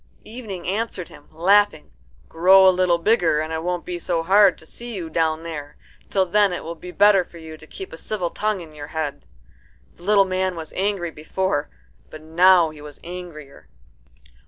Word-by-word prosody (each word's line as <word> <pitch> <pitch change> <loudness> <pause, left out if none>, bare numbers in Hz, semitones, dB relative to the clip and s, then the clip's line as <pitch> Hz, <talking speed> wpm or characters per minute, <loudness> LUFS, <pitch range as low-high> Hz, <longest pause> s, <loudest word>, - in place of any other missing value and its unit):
Evening 215 -6 -8
answered 200 -3 -3
him, 145 - -16
laughing, 185 0 +2 0.4
"Grow 190 +3 +6
a - - +8
little 180 -1 +2
bigger, 170 -4 +2
and 155 +1 -3
it 160 - -2
won't 175 +1 -3
be 175 -1 -5
so 170 -1 -1
hard 195 +2 +5
to - - -16
see 235 +7 -7
you 170 -4 -6
down 160 0 0
there. 150 -3 -7 0.3
Till 190 -1 +2
then 205 +2 +3
it - - -4
will 165 - -5
be 175 +2 -11
better 200 0 +4
for 175 - -16
you 160 -1 -10
to 155 0 -15
keep 190 - -9
a - - -8
civil 180 -1 -3
tongue 215 -3 -2
in 160 -2 -12
your 145 -1 -9
head." 150 -3 -4 0.7
The - - -22
little 200 +1 +4
man 185 -1 -1
was 160 -2 -8
angry 190 -3 -1
before, 155 0 -2 0.4
but 155 0 -11
now 170 +1 +4
he 150 -1 -13
was 150 -1 -11
angrier. 170 -5 -10
175 Hz, 190 wpm, -22 LUFS, 160-190 Hz, 0.7 s, a